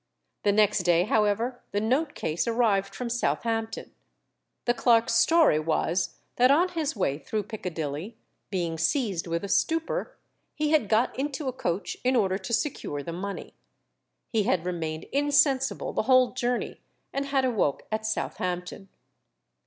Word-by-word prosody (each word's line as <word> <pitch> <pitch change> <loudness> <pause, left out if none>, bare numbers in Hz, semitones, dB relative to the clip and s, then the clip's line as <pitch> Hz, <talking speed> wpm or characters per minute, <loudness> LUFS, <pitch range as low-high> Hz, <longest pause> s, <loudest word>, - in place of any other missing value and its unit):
The 205 - +3
next 210 -1 +3
day, 175 -1 +3
however, 220 +4 +1
the 205 - +2
note 265 +8 0
case 160 +6 -2
arrived 205 -4 +1
from 250 - -4
Southampton. 225 -1 -2 0.7
The 240 - +3
clerk's 235 -2 +3
story 295 - +5
was, 165 +3 0 0.2
that 250 +1 +5
on 335 +7 +4
his 320 -5 -2
way 150 -8 0
through 215 +5 -3
Piccadilly, 180 -1 -5 0.3
being 170 -4 -2
seized 185 - 0
with 170 +1 -2
a - - -3
stupor, 325 - 0 0.4
he 300 0 0
had 295 -10 +3
got 225 +3 +2
into 285 0 -2
a 260 - -1
coach 180 -5 -3
in 255 +1 +2
order 195 -4 +2
to 190 +4 -7
secure 220 - -2
the 165 - -5
money. 195 +3 -6 0.7
He 225 - +1
had 180 -4 0
remained 160 -3 -3
insensible 280 -1 +2
the - - +1
whole 255 -1 +6
journey, 245 -1 -2 0.3
and 275 0 -2
had 270 -1 +1
awoke 215 - 0
at 215 0 -1
Southampton. 185 -3 -3
220 Hz, 150 wpm, -27 LUFS, 180-255 Hz, 0.7 s, whole